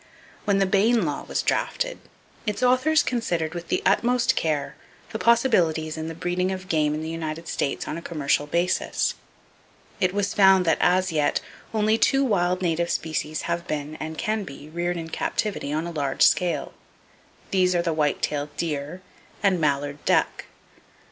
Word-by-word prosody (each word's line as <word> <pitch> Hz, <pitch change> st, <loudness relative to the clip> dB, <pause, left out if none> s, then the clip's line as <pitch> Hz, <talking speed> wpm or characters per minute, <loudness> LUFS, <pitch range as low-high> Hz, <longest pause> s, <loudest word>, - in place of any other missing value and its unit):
When 200 Hz, -2 st, +2 dB
the 195 Hz, -, +3 dB
Bayne 205 Hz, +2 st, +3 dB
law 145 Hz, -2 st, -3 dB
was -, -, -1 dB
drafted, -, -, -1 dB, 0.5 s
its 210 Hz, +4 st, -1 dB
authors 255 Hz, +5 st, +4 dB
considered 170 Hz, -10 st, -1 dB
with 175 Hz, -1 st, -6 dB
the -, -, -1 dB
utmost 240 Hz, +5 st, +3 dB
care 155 Hz, -3 st, -1 dB, 0.4 s
the -, -, -4 dB
possibilities 175 Hz, -10 st, +2 dB
in 160 Hz, 0 st, -4 dB
the 165 Hz, -, -6 dB
breeding 180 Hz, +2 st, -1 dB
of 185 Hz, 0 st, -5 dB
game 150 Hz, -3 st, +1 dB
in 155 Hz, -, -4 dB
the -, -, -4 dB
United 165 Hz, 0 st, -5 dB
States 140 Hz, -, -2 dB
on -, -, -3 dB
a -, -, -6 dB
commercial 145 Hz, -3 st, 0 dB
basis. 175 Hz, +4 st, 0 dB, 0.9 s
It 185 Hz, -1 st, +2 dB
was 200 Hz, +1 st, -1 dB
found 190 Hz, -2 st, +5 dB
that 160 Hz, -, +2 dB
as 185 Hz, 0 st, +3 dB
yet 150 Hz, -2 st, +1 dB, 0.3 s
only 220 Hz, 0 st, +2 dB
two 270 Hz, 0 st, +3 dB
wild 180 Hz, -5 st, +1 dB
native 170 Hz, 0 st, 0 dB
species 155 Hz, -1 st, -2 dB
have 170 Hz, +1 st, -3 dB
been, 150 Hz, 0 st, -3 dB
and 160 Hz, 0 st, -6 dB
can 220 Hz, -2 st, -1 dB
be, 145 Hz, -3 st, -10 dB
reared 175 Hz, +2 st, -2 dB
in 165 Hz, -1 st, -6 dB
captivity 205 Hz, -9 st, -2 dB
on 155 Hz, +2 st, -1 dB
a 170 Hz, -, -4 dB
large 140 Hz, -4 st, 0 dB
scale. 180 Hz, -1 st, +2 dB, 0.8 s
These 185 Hz, -1 st, +3 dB
are 170 Hz, -, +2 dB
the 165 Hz, -, 0 dB
white 150 Hz, -2 st, 0 dB
tailed 145 Hz, 0 st, -2 dB
deer 155 Hz, +2 st, -3 dB, 0.4 s
and 190 Hz, -4 st, +3 dB
mallard 145 Hz, -1 st, -1 dB
duck. -, -, +1 dB
170 Hz, 170 wpm, -24 LUFS, 155-195 Hz, 0.9 s, found